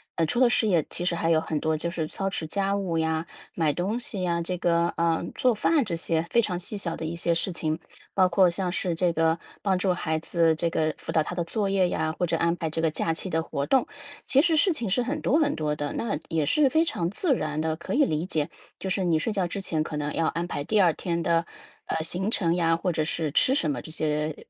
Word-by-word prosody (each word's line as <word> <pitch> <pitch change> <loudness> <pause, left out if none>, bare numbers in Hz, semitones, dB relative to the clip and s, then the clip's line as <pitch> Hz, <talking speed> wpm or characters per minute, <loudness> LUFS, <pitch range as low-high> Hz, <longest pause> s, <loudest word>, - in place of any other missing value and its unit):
呃， 165 - +2
除 200 +10 -1
了 255 -2 +6
事 225 - +2
业 170 -7 +2
其 175 - -3
实 180 - 0
还 165 -1 0
有 160 -1 +4
很 155 -2 -2
多 160 0 0
就 170 +3 -2
是 165 -3 -2
操 195 +4 -2
持 165 -4 -4
家 195 +3 0
务 190 -5 -1
呀， 160 0 0 0.3
买 160 -3 +1
东 200 +9 -1
西 200 -5 -3
呀， 170 -1 0
这 180 +2 -2
个， 170 -1 +2
呃， 165 -1 +1
做 250 -2 +3
饭 295 +7 +2
这 190 -7 -1
些 165 -1 0
非 235 - +5
常 180 -5 -2
细 205 +4 -4
小 170 -4 -2
的 160 - -5
一 165 +2 -3
些 170 0 +1
事 175 +3 -1
情。 155 -1 -2 0.4
包 185 -1 +5
括 180 0 +4
像 180 +1 -1
是 175 -1 -1
这 175 0 +1
个 165 0 +2 0.2
帮 195 -2 +1
助 185 -1 +2
孩 160 -2 -1
子 165 0 +2
这 170 +1 0
个 155 -1 0
辅 - - -6
导 160 - +3
他 180 - -5
的 175 - -1
作 200 +3 -1
业 190 -2 +3
呀， 160 -2 -1
或 180 - +2
者 165 - 0
安 170 +1 +2
排 165 -2 -2
这 160 +1 -2
个 160 - +2
假 165 +1 -1
期 175 +4 -4
的 160 -1 +1
活 140 -3 -3
动， 265 - +2 0.4
其 275 - +5
实 330 0 +2
事 360 +4 +4
情 240 -9 -3
是 220 +7 +2
很 285 +5 -2
多 295 - +3
很 290 -2 +2
多 150 -1 -1
的， 145 -1 -3
那 230 -3 -2
也 160 -3 0
是 280 - +3
非 315 +4 +3
常 175 - -1
自 285 - +1
然 155 -10 -2
的， 160 0 -1
可 170 - -5
以 290 - +4
理 155 - 0
解， 155 -5 -1 0.3
就 190 - -5
是 190 0 0
你 165 -3 +2
睡 215 - -1
觉 190 -4 0
之 195 +3 -4
前 160 -5 -1
可 155 - -6
能 150 0 -2
要 165 - 0
安 170 +1 -1
排 145 -4 -4
第 210 -2 +3
2 175 - +5
天 170 +1 -2
的， 170 -1 +2 0.4
呃， 160 - -2
行 180 +5 -1
程 175 -7 +1
呀， 165 -2 +2
或 180 +2 -1
者 155 -2 -1
是 155 -2 -2
吃 260 - +3
什 290 - +1
么， - - -3
这 - - -10
些 150 -1 0
170 Hz, 285 characters per minute, -26 LUFS, 160-195 Hz, 0.4 s, 了